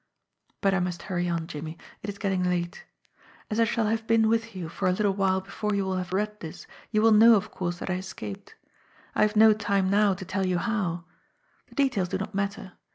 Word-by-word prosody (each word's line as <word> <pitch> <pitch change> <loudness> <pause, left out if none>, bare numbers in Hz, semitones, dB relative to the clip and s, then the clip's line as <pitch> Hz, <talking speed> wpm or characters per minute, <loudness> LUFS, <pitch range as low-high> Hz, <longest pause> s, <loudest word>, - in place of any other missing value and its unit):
"But 195 -1 +3
I 190 - +2
must 180 -1 -3
hurry 175 -2 -2
on, 170 -1 -1
Jimmie. 155 +1 -7 0.2
It 205 - -5
is 200 - -6
getting 195 -3 0
late. 175 0 -2 0.7
"As 215 - 0
I 230 - +5
shall 225 0 0
have 225 +1 -1
been 225 -1 +4
with 225 -1 0
you 180 -3 -4
for 185 +3 -2
a - - +4
little 200 +1 +1
while 190 -1 +1
before 205 +2 -3
you 200 -1 0
will 190 -1 -1
have 180 -1 -4
read 210 +2 -1
this, 160 -2 -8 0.2
you 215 -1 +1
will 225 - +6
know 225 +2 +8
of 210 +1 -1
course 175 -1 -3
that - - -6
I 180 - 0
escaped. 110 - -8 0.6
I - - 0
have 215 0 +3
no 220 0 +7
time 200 -3 0
now 205 -1 +4
to 190 +1 -8
tell 190 +1 -1
you 180 -1 +1
how. 180 -5 -1 0.6
The - - -19
details 255 -11 +1
do 190 - -1
not 195 - -5
matter. 200 0 -3
195 Hz, 225 wpm, -27 LUFS, 180-215 Hz, 0.7 s, know